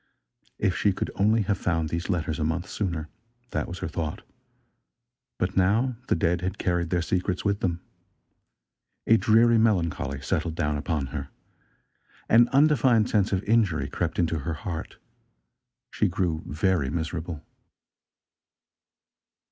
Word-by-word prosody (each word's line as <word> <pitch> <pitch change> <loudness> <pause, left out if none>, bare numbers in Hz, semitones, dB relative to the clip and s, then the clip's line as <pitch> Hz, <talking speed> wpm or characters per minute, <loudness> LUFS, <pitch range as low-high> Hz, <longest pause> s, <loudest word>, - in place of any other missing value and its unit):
If 95 -3 +1
she 100 - +2
could - - -3
only 110 +3 +2
have 100 -1 -1
found 80 -3 0
these 85 +4 -3
letters 85 -3 -1
a - - 0
month 85 +4 -1
sooner! 85 -8 -3 0.4
That 75 - -2
was 90 - -6
her - - -2
thought. 80 -2 -4 1.1
But 90 +1 -1
now 110 +7 +2
the - - +2
dead 90 -1 +1
had 95 +2 -3
carried 85 -2 0
their 85 -1 0
secrets 90 +1 -1
with 100 0 +1
them. 85 -2 -1 1.2
A 115 - +5
dreary, 115 +1 +4
melancholy 85 - +1
settled 80 +1 -1
down 75 -3 0
upon 75 -1 -2
her. 70 -2 -4 1.0
An 120 +1 +6
undefined 130 -6 +4
sense 105 -2 +2
of 95 0 0
injury 105 -7 +2
crept - - -3
into 80 -2 +1
her 80 +3 -3
heart. 85 -1 -6 0.9
She 105 - +1
grew 90 -4 -1
very 75 -1 +1
miserable. 80 0 -4
90 Hz, 140 wpm, -26 LUFS, 80-105 Hz, 1.2 s, An